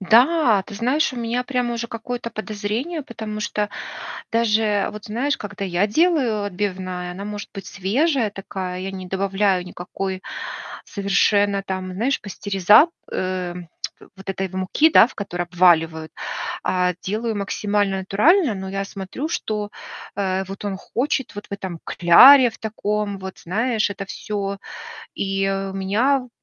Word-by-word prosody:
Да, 235 - +5
ты - - -9
знаешь, 255 +8 +1
у - - -8
меня 240 +1 -1
прямо 250 -2 -1
уже 235 0 -3
какое-то 235 +1 -5
подозрение, 215 - -3
потому 220 -5 -6
что 210 0 -1 0.6
даже 215 -2 +2
вот, 210 0 -9
знаешь, 255 +6 0
когда 205 -1 -5
я 185 +1 +1
делаю 255 - +2
отбивная, 185 -2 -3
она 195 +3 -7
может 205 -1 -6
быть 195 - -7
свежая 235 - +1
такая. 190 -2 -5
Я 190 +1 -4
не 190 -1 -7
добавляю 195 0 +1
никакой 185 +1 -5 0.6
совершенно 200 0 +2
там, 185 -1 -4
знаешь, 240 +8 0
пастериза 200 - +4 0.2
э, 185 -1 -2 0.6
вот 190 0 -12
этой 195 0 -2
муки, 190 - +2
да, 230 - +8
в 250 - -14
которой 175 -4 -3
обваливают, 165 -3 +3 0.5
а 180 -1 +1
делаю 220 +3 -2
максимально 200 0 0
натурально. 230 - +3
Но 190 -1 -5
я 195 0 -2
смотрю, 200 +9 -5
что, 210 -8 -2 0.5
э, 190 -1 0
вот 195 +1 -7
он 200 -2 -2
хочет 265 +6 -2
вот 205 0 -7
в - - -11
этом 190 -4 -5
кляре 250 +9 +8
в - - -15
таком. 210 -2 -2
Вот, 190 0 -8
знаешь, 220 +4 0
это 200 0 -5
всё. 200 0 -4 0.6
И 195 0 0
у 195 0 -3
меня, 245 +8 +1
205 Hz, 145 wpm, -22 LUFS, 190-230 Hz, 0.6 s, да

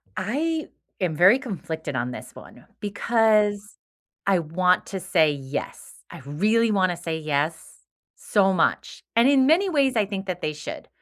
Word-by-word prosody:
I 305 - -2 0.3
am 170 -4 0
very 190 - +6
conflicted 165 - -6
on 125 0 -2
this - - -9
one, - - -14
because 210 -1 +1 0.5
I 195 -3 +3
want 180 +3 +1
to 195 - -5
say 155 -3 +2
yes. 140 0 -6
I - - -10
really 210 - +1
wanna 185 -3 +1
say 165 -2 -4
yes, 155 +1 -3 0.4
so 195 -2 +1
much. 170 - -1
And 230 +2 +5
in 270 -2 +4
many 355 +7 +3
ways, 275 -5 +2
I 215 -2 +2
think 195 -1 -6
that 180 -1 -4
they 155 - -2
should, 150 +1 -8
195 Hz, 160 wpm, -24 LUFS, 160-225 Hz, 0.5 s, very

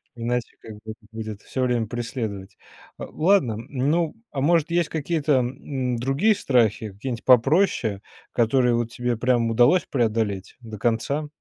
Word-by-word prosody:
Иначе, 120 +1 -2
как 110 - -10
бы, 105 - -14
это 110 0 -14
будет 110 -2 -6
всё 130 - -4
время 120 -3 0
преследовать. 115 -5 -5 0.4
Ладно, 160 - +1
ну, 150 +5 0 0.2
а 140 - -4
может 165 +3 +2
есть 170 0 +2
какие-то, 155 -1 -1
м, 125 0 -3
другие 140 - +2
страхи, 115 - +1
какие 125 +6 -5
нить 115 - -6
попроще, 125 - +3 0.3
которые 120 +1 +2
вот 115 0 -2
тебе 120 -2 -2
прям 120 -1 +1
удалось 120 +11 +4
преодолеть 110 -6 -1
до 110 -2 -9
конца? 120 +7 -1
125 Hz, 145 wpm, -24 LUFS, 115-140 Hz, 0.4 s, удалось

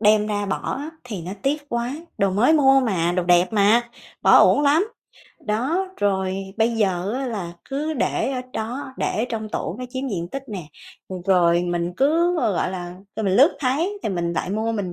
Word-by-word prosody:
đem 210 0 +4
ra 205 -1 -2
bỏ 195 - -2
á, 295 +3 -5
thì 210 -8 -6
nó 180 +3 -6
tiếc 290 +1 -1
quá. 235 0 -2 0.3
Đồ 195 -1 +2
mới 215 +10 +3
mua 270 -3 +5
mà, 175 -8 0
đồ 180 - 0
đẹp 175 +3 +3
mà, 220 +3 +3 0.3
bỏ - - +7
uổng - - +5
lắm. 300 +6 +4 0.6
Đó, 265 - 0
rồi 190 -2 0 0.2
bây 225 +1 +3
giờ 190 -1 0
á, 265 +1 -2
là 195 -8 -4 0.2
cứ 300 +3 -2
để 275 - 0
ở 255 - -2
đó, 250 +5 -5
để 230 +3 -1
trong 220 -2 -3
tủ 175 -2 -4
nó 250 - -5
chiếm 260 +2 -4
diện 175 -6 -3
tích 275 +4 -5
nè. 185 -7 -6 0.6
Rồi 175 -2 +4
mình 175 0 -2
cứ, 335 +6 +3
gọi 195 - 0
là, 175 -1 -6 0.2
rồi 220 - -2
mình 190 -1 +2
lướt 285 +7 +5
thấy 320 +10 0
thì - - -1
mình 170 -3 -1
lại 170 - -2
mua. 220 +3 -1
Mình 200 -5 -3
220 Hz, 200 wpm, -22 LUFS, 185-270 Hz, 0.6 s, bỏ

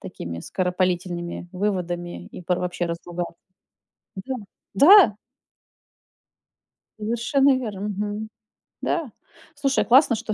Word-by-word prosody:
такими 85 -1 -7
скоропалительными 180 - -2
выводами 180 -3 -3
и - - -10
пор 180 +1 0
вообще 180 -1 -2
разругаться. 170 +1 -5 0.8
Да, 260 +8 -4 0.4
да! 290 - +8 1.9
Совершенно 240 +5 +2
верно. 215 -7 -5
Мгм. 210 +1 -3 0.5
Да. 320 -8 -1 0.4
Слушай, 275 -2 +1
классно, 255 -1 +5
что 220 0 -4
200 Hz, 95 wpm, -24 LUFS, 175-240 Hz, 1.9 s, да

